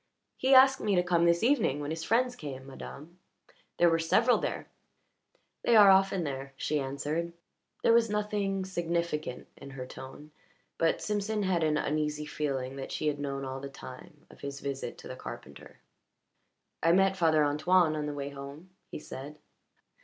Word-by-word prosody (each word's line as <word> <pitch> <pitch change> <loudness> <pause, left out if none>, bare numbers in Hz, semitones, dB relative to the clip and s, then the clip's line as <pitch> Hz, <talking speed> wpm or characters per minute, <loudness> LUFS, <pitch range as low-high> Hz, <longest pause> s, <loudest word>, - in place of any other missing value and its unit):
"He 265 +1 +3
asked 265 +1 +7
me 205 -2 +1
to 180 - +3
come 175 -1 +2
this 170 +2 +3
evening, 230 - +2
when 145 +1 -4
his 160 0 -4
friends 245 +5 +1
came, 135 - -7
madame. 150 +5 -10 0.6
There 175 - +5
were 165 -1 +3
several 225 +9 +3
there." - - -4 0.9
"They 235 - +3
are 205 -3 +9
often 195 -1 +3
there," 135 -2 -5
she 150 +1 -1
answered. 150 +5 -3 0.5
There 230 - +5
was 230 -1 +4
nothing 205 -2 -1
significant 170 -6 -2
in 140 - -10
her 135 -2 -7
tone, 135 +4 -11 0.5
but 165 -1 +1
Simpson 210 0 -1
had 180 -3 +1
an 155 -1 +2
uneasy 150 0 -1
feeling 135 -3 -3
that 135 - -6
she - - -3
had 145 -1 0
known 140 -1 -3
all 130 0 -5
the 140 0 -7
time 130 -2 -12
of - - -17
his 140 0 -6
visit 140 -1 -5
to - - -11
the - - -7
carpenter. - - -10 1.0
"I 165 +1 +4
met 190 +1 +4
Father 160 -4 +3
Antoine 155 +3 +3
on 150 -1 -2
the 145 - -4
way 140 0 -4
home," 140 +5 -10 0.2
he - - -6
said. 150 0 -9
160 Hz, 175 wpm, -30 LUFS, 140-190 Hz, 1.0 s, are